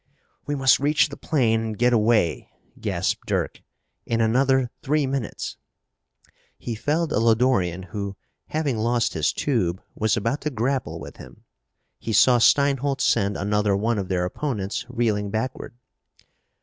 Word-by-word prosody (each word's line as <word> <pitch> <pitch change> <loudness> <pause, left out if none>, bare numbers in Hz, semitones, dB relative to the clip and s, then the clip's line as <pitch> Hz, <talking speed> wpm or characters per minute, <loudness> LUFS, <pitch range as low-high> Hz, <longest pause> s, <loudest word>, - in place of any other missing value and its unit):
"We 145 - -1
must 135 -1 +4
reach 150 +2 +2
the 140 - -8
plane 115 -7 +1
and 110 -2 -4
get 120 +2 +3
away," 110 -5 +2 0.3
gasped - - -2
Dirk. - - -2 0.5
"In 115 - 0
another 130 +2 +2
three 150 +1 +1
minutes 135 -3 -4 0.5
" - - -36 0.3
He 120 - -5
felled 150 +8 -1
a - - +2
Lodorian 110 -6 +2
who, 100 0 -5 0.3
having 145 -7 -1
lost 120 +1 +1
his 80 -2 +1
tube, 95 -11 -1
was 110 0 0
about 115 +7 -1
to 150 - -1
grapple 130 0 -2
with - - -10
him. - - -14 0.6
He 115 - -4
saw 120 +4 +5
Steinholt 140 +2 +3
send 100 -3 +1
another 105 0 +1
one 110 +1 0
of 95 - -3
their 90 -1 0
opponents 105 -1 -3
reeling 110 -4 0
backward. 120 +2 -4
115 Hz, 150 wpm, -24 LUFS, 105-135 Hz, 0.6 s, saw